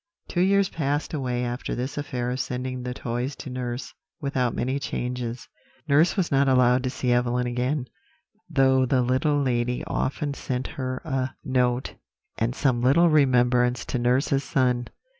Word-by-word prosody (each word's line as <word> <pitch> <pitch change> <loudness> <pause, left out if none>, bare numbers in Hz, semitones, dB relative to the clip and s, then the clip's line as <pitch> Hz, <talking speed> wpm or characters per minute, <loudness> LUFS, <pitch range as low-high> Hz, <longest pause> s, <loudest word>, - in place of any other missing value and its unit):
"Two 175 - -1
years 200 +1 +4
passed 145 -2 -2
away 125 -4 -1
after 120 +1 -3
this 125 +3 -3
affair 125 -4 -3
of 130 - -3
sending 130 0 -3
the 125 0 -4
toys 125 +3 -3
to 135 - -8
nurse, 125 0 -4 0.3
without 130 -4 -1
many 130 +3 -1
changes. 125 -3 -4 0.4
Nurse 155 +8 +4
was 180 -4 0
not 140 0 +3
allowed 125 -1 +4
to - - +1
see 125 -1 -1
Evelyn 120 0 +1
again, 125 +3 -1 0.6
though 135 -4 +4
the 125 0 +2
little 130 +4 +2
lady 125 -2 0
often 140 +2 -2
sent 130 -2 -3
her 130 -2 -4
a 130 -3 -2
note, 125 0 0 0.5
and 115 +3 0
some 130 -5 +1
little 145 +8 +5
remembrance 125 -4 +3
to 125 - -2
nurse's 130 +3 +2
son. 125 -1 +1
130 Hz, 160 wpm, -25 LUFS, 125-140 Hz, 0.6 s, little